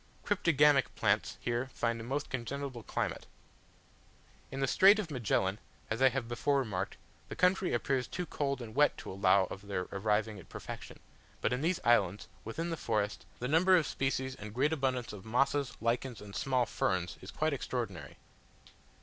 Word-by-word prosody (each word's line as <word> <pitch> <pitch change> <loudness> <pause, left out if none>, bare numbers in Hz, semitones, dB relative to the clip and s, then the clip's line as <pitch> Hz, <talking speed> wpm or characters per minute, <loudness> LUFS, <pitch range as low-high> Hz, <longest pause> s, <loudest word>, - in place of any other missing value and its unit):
Cryptogamic 150 - +4
plants - - +1
here 120 +2 -1
find 115 -1 0
a - - -6
most 135 +5 -3
congenial 135 +3 -3
climate. - - -3 1.2
In 135 - -5
the 135 - +2
Strait 195 +9 +6
of 195 -7 -3
Magellan, 100 -6 0 0.3
as 110 +3 -1
I 130 - +7
have 130 -2 -3
before 140 +4 +1
remarked, 105 -9 -2 0.3
the - - -5
country 185 0 +2
appears 125 +1 0
too 180 - -4
cold 140 -4 -2
and 110 -2 -9
wet 150 +3 +4
to - - -7
allow 95 0 +4
of 100 +1 -8
their 90 -2 -2
arriving 105 +1 0
at - - -14
perfection; - - -8 0.4
but 125 - +1
in 125 - -1
these 170 +3 +1
islands, 105 -5 +3 0.2
within 165 +10 -3
the 165 - -2
forest, 105 -5 -1
the 125 - -3
number 180 +6 +5
of 165 - +2
species 130 -1 -1
and 105 -2 -9
great 145 +5 +2
abundance 130 -6 -1
of 100 -2 -9
mosses, 135 +4 +1
lichens, 120 +1 -1
and 100 -1 -10
small 130 +3 +1
ferns, 90 -5 -1
is - - -9
quite - - 0
extraordinary. - - -4
125 Hz, 175 wpm, -32 LUFS, 110-140 Hz, 1.2 s, I